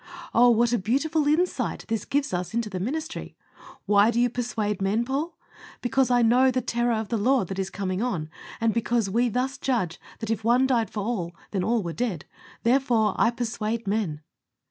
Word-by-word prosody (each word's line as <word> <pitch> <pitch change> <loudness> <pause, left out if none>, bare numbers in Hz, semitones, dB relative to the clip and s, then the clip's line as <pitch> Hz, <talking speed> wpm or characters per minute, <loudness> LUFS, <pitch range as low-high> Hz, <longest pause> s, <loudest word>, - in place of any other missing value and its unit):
Oh! 245 +1 +6
what 240 +1 +3
a 240 - +2
beautiful 290 - +1
insight 340 +5 0
this 225 -2 -2
gives 280 -6 -1
us 180 +4 -3
into 230 -3 -1
the 185 - -3
ministry. 310 - -4 0.5
Why 205 +1 +5
do 235 0 +1
you 245 -1 +3
persuade 220 -5 -2
men, 210 +5 +1
Paul? 295 +6 -3 0.4
"Because 255 +1 +1
I 245 -1 +4
know 250 +3 +5
the 255 0 +1
terror 240 0 0
of 220 -1 -3
the 230 - 0
Lord 245 -3 +2
that 195 0 -4
is 190 0 -1
coming 190 -1 -3
on, 185 -11 -1 0.3
and 225 -1 +2
because 230 -3 0
we 240 +3 +2
thus 255 +4 -2
judge 205 -11 -1 0.2
that, 225 0 -4
if 220 -1 -2
One 245 +3 +4
died 235 -6 +1
for 210 - -4
all, 185 -7 -3 0.2
then 195 - -1
were - - -1
all 235 -3 +2
dead. 215 -9 -2 0.4
Therefore, 235 -3 +3
I - - +3
persuade 230 -1 -3
men." 195 -7 -1
230 Hz, 195 wpm, -25 LUFS, 205-250 Hz, 0.5 s, Oh